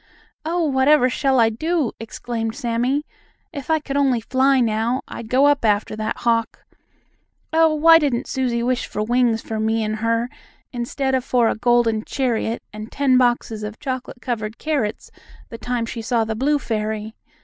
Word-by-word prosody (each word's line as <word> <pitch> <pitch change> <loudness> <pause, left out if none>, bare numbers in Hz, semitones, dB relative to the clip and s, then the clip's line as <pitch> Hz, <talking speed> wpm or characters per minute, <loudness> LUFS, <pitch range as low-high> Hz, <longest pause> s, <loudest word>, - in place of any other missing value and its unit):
"Oh, 335 +2 0
whatever 265 -1 +3
shall 270 -1 +1
I 225 -1 +5
do?" 315 +2 -1
exclaimed 225 0 -4
Sammie. 255 +3 -1 0.5
"If 280 -2 -7
I 320 - +4
could 290 -2 -6
only 270 -4 +2
fly 260 +4 +2
now, 230 +2 0
I'd 225 - -8
go 260 +3 +4
up 290 -2 +3
after 210 -1 +1
that 215 0 -3
hawk. 230 -1 0 0.9
Oh, 320 -1 +4
why 325 +2 +7
didn't 275 -4 0
Susie 245 -3 -1
wish 250 0 -1
for 210 - -3
wings 235 0 +1
for 220 -1 -4
me 220 +1 0
and 215 0 -2
her 230 +2 0 0.5
instead 265 +3 -2
of 260 -1 +1
for 245 -3 +2
a - - -1
golden 235 -2 +2
chariot 235 -4 -2
and 215 +1 -8
ten 265 -3 +3
boxes 240 -3 0
of 210 +1 -6
chocolate 260 -3 -5
covered 220 -3 -3
carrots 275 -9 -2 0.4
the 230 - -9
time 245 -2 -2
she 230 0 -6
saw 230 0 +1
the 220 0 -3
blue 280 +7 +1
fairy? 220 -3 -3
240 Hz, 170 wpm, -21 LUFS, 225-270 Hz, 0.9 s, why